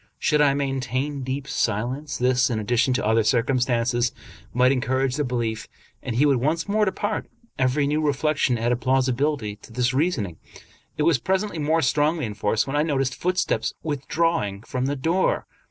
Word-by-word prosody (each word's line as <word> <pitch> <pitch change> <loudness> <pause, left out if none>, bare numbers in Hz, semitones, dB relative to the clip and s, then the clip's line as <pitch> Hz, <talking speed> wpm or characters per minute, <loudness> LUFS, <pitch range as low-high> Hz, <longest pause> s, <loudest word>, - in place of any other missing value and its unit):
Should 150 0 +2
I 140 -2 +4
maintain 135 0 -2
deep 135 +2 -4
silence, 130 +4 -2
this, 125 0 +2
in 115 - -1
addition 120 +4 +1
to 125 - -1
other 110 +1 +3
circumstances, 120 0 +1 0.4
might 125 +2 +4
encourage 130 0 0
the 150 - 0
belief, 115 -4 -2 0.3
and 115 - -4
he 135 +5 +4
would 140 -3 +4
once 155 +8 0
more 210 +1 +2
depart. 205 +1 -2 0.3
Every 135 +3 +2
new 150 +2 0
reflection 145 -3 +1
added 120 +2 0
plausibility 130 -3 0
to 110 - -16
this 120 +2 0
reasoning. 130 - 0 0.6
It 150 - +1
was 155 -4 +3
presently 190 -1 -1
more 160 +2 +1
strongly 150 +3 +1
enforced 105 0 0
when 135 - -4
I 145 - +3
noticed 135 -4 0
footsteps 180 +4 -1
withdrawing 145 -7 -1
from 130 +2 -2
the 145 - -1
door. 165 +7 0
135 Hz, 165 wpm, -24 LUFS, 120-150 Hz, 0.6 s, I